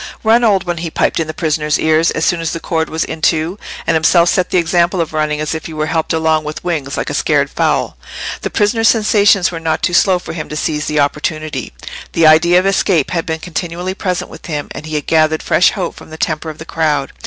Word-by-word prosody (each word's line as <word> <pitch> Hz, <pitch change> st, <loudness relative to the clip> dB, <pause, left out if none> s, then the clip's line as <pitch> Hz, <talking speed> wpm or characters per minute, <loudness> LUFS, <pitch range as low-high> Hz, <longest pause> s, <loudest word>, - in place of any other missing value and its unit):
"Run, 230 Hz, +2 st, +4 dB
old 205 Hz, -4 st, +3 dB
one!" 175 Hz, -1 st, -2 dB
he 165 Hz, 0 st, -4 dB
piped -, -, 0 dB
in 165 Hz, -, -1 dB
the -, -, -3 dB
prisoner's 155 Hz, -2 st, 0 dB
ear, 160 Hz, 0 st, +2 dB
as 160 Hz, -1 st, +1 dB
soon 175 Hz, -2 st, +1 dB
as 165 Hz, -, -2 dB
the 165 Hz, -, -4 dB
cord 160 Hz, -1 st, -2 dB
was 160 Hz, +1 st, -1 dB
in 160 Hz, -, -6 dB
two; 165 Hz, +5 st, +1 dB, 0.3 s
and -, -, +1 dB
himself 170 Hz, +2 st, +4 dB
set 185 Hz, -, +1 dB
the -, -, +1 dB
example 175 Hz, +1 st, +2 dB
of 165 Hz, -1 st, -2 dB
running 150 Hz, -1 st, -1 dB
as 155 Hz, 0 st, -2 dB
if 160 Hz, -, -5 dB
he 160 Hz, -, -8 dB
were 155 Hz, 0 st, -1 dB
helped 160 Hz, 0 st, -1 dB
along 160 Hz, -1 st, +1 dB
with 150 Hz, +1 st, -6 dB
wings, 155 Hz, -6 st, -3 dB
like -, -, -2 dB
a -, -, -4 dB
scared -, -, +1 dB
fowl. -, -, 0 dB, 0.4 s
The -, -, -3 dB
prisoner's 225 Hz, +2 st, +2 dB
sensations 205 Hz, -4 st, +3 dB
were 165 Hz, -, -5 dB
not 160 Hz, -1 st, -2 dB
too 175 Hz, -, +1 dB
slow 185 Hz, +1 st, +4 dB
for 180 Hz, -, -8 dB
him 155 Hz, -2 st, -6 dB
to 150 Hz, -, -5 dB
seize 150 Hz, -1 st, -2 dB
the 150 Hz, -, 0 dB
opportunity: 150 Hz, -1 st, -2 dB, 0.4 s
the 165 Hz, -, +3 dB
idea 160 Hz, +3 st, +6 dB
of 185 Hz, -, +2 dB
escape 190 Hz, -5 st, +1 dB
had 165 Hz, -2 st, -2 dB
been 160 Hz, -1 st, -1 dB
continually 175 Hz, +2 st, -4 dB
present 185 Hz, -3 st, -3 dB
with -, -, -11 dB
him, 150 Hz, -3 st, -4 dB
and 150 Hz, -, -8 dB
he 155 Hz, -, -4 dB
had 150 Hz, -, -2 dB
gathered 155 Hz, -1 st, +2 dB
fresh 180 Hz, -, +4 dB
hope 185 Hz, -4 st, -3 dB
from -, -, -13 dB
the 160 Hz, -, -9 dB
temper 160 Hz, 0 st, -2 dB
of 155 Hz, -, -8 dB
the 160 Hz, -, -9 dB
crowd. 150 Hz, -5 st, -1 dB
160 Hz, 245 wpm, -16 LUFS, 155-175 Hz, 0.4 s, idea